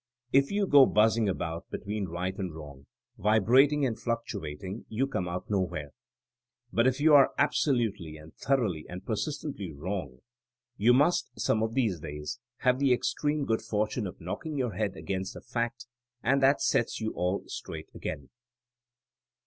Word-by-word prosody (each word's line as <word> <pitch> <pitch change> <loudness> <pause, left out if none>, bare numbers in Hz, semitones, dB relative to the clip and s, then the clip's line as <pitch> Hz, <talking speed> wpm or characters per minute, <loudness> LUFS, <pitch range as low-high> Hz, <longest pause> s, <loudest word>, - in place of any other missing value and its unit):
If 135 +1 +5
you 200 0 +1
go 140 -6 +7
buzzing 110 0 +3
about 85 -3 -4
between 105 0 -3
right 90 +3 -3
and 95 -5 -4
wrong, 70 -3 -11 0.3
vibrating 130 +8 +4
and 120 -4 0
fluctu 115 -9 -3
ating, 95 +9 -7
you 120 +5 0
come 95 -10 -2
out 90 +1 -4
nowhere; 90 -8 -2 0.8
but 115 +2 +4
if 130 +1 +1
you 155 +1 +5
are 140 -2 +7
ab 140 - +3
solutely 105 - 0
and 75 +1 -14
thoroughly 110 - 0
and 90 +1 -8
persistently 115 - -3
wrong, 75 -4 -5 0.5
you 115 +3 +4
must, 145 +8 +3
some 110 - +1
of 110 +1 -1
these 110 -10 +1
days, 75 +9 -6 0.2
have 125 0 +3
the 140 -2 +3
extreme 145 +3 0
good 110 -2 0
fortune 110 0 -1
of 90 - -9
knocking 145 - -5
your 125 -5 -1
head 105 -3 -2
against 95 -1 -4
a - - -8
fact, 120 +1 -3 0.4
and 135 +3 +3
that 135 +2 +4
sets 115 - +1
you 110 -1 -2
all 90 +2 -1
straight - - -7
again. 70 -3 -6
110 Hz, 165 wpm, -29 LUFS, 90-130 Hz, 0.8 s, go